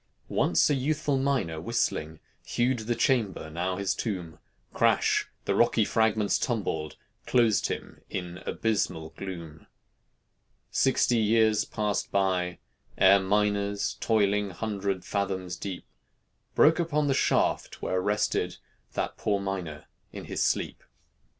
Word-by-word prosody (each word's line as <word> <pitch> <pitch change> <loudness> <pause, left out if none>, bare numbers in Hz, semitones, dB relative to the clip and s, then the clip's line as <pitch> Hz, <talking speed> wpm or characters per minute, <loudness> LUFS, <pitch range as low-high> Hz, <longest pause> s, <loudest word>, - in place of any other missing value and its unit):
Once 85 -1 +3
a - - +2
youthful 145 0 0
miner, 130 - 0
whistling, 80 -7 -1 0.2
Hewed 120 +1 0
the 115 +2 -2
chamber, 105 - 0
now 90 +3 -2
his 95 -1 0
tomb: 90 -9 -4 0.3
Crash! - - +2 0.2
the - - +1
rocky - - +3
fragments 110 -2 +2
tumbled, 95 - -2 0.3
Closed 115 -4 +3
him - - -6
in 90 -1 -5
abysmal 90 -8 -1
gloom. 85 -5 -8 1.0
Sixty 125 -2 +3
years 110 -1 +3
passed 105 -2 -2
by, 90 -2 +1 0.4
ere 95 +1 +7
miners 100 +1 0
Toiling, 105 -2 +2
hundred 100 -1 -3
fathoms 95 -3 -2
deep, 95 -1 -6 0.7
Broke 160 +3 +5
upon 150 -3 +1
the 140 - +2
shaft - - +1
where 95 0 0
rested 105 +2 0 0.4
That - - -3
poor 100 -2 0
miner 90 -6 -4 0.3
in - - -8
his - - -3
sleep. - - 0
100 Hz, 120 wpm, -28 LUFS, 90-115 Hz, 1.0 s, ere